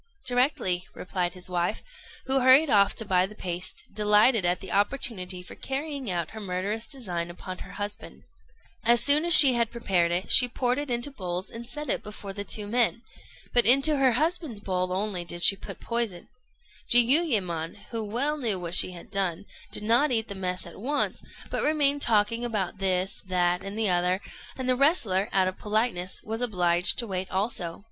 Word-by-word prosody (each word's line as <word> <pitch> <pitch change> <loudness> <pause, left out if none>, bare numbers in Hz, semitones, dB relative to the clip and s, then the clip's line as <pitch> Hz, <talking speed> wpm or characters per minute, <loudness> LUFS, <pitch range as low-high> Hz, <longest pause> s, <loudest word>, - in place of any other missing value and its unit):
"Directly," 245 -8 0
replied 180 -1 -3
his 180 - -7
wife, 175 +2 -2 0.4
who 265 0 +1
hurried 265 +3 +5
off 200 -1 +3
to 225 - -2
buy 185 -1 +1
the 210 - -14
paste, 180 -2 -5
delighted 210 0 +3
at 175 +1 +1
the 190 - -9
opportunity 195 -4 -1
for - - -12
carrying 275 -2 -5
out 170 -3 -3
her 220 - -9
murderous 205 +3 -4
design 180 -10 -5
upon 185 +1 -9
her 190 - -11
husband. 205 0 -7 0.6
As 235 0 +4
soon 300 +4 +4
she 290 -6 +11
had 235 -2 0
prepared 185 -8 0
it, 180 +3 -2
she 250 - +8
poured 250 +1 -1
it 290 -1 -5
into 240 +3 -1
bowls 185 -6 -5
and 230 +1 -8
set 300 +3 -5
it - - -1
before 205 -1 -9
the 200 0 -5
two 210 +1 -2
men; 235 +2 0 0.5
but 240 -2 +4
into 275 +4 +6
her 265 -2 +3
husband's 310 - -1
bowl 185 -2 -3
only 190 -1 -3
she 175 +3 +5
put 195 - -10
poison. 230 -7 -3 0.6
Jiuyémon, 230 - +2 0.2
who 225 -2 -3
well 255 +9 -2
knew 225 -9 -1
what 170 -1 -5
she 180 - +5
had 180 +4 -13
done, 195 -3 -2 0.3
did - - 0
not 240 +7 +2
eat 225 -2 +1
the - - -5
mess 185 -1 -4
at 170 - -12
once, 285 +7 -2 0.3
but - - -2
remained 290 -2 +2
talking 230 0 +1
about 210 -5 -3
this, 190 0 -1
that, 180 -1 0
and 195 +2 -7
the 220 -4 +1
other; 180 +1 0 0.4
and 260 -1 -5
the 255 - +2
wrestler, 240 - +2
out 190 -1 +2
of 185 - -5
politeness, 210 -4 -2
was 225 +2 -5
obliged 180 -6 +1
to 240 - -1
wait 190 -3 -4
also. 190 -4 -3
210 Hz, 185 wpm, -26 LUFS, 185-245 Hz, 0.6 s, she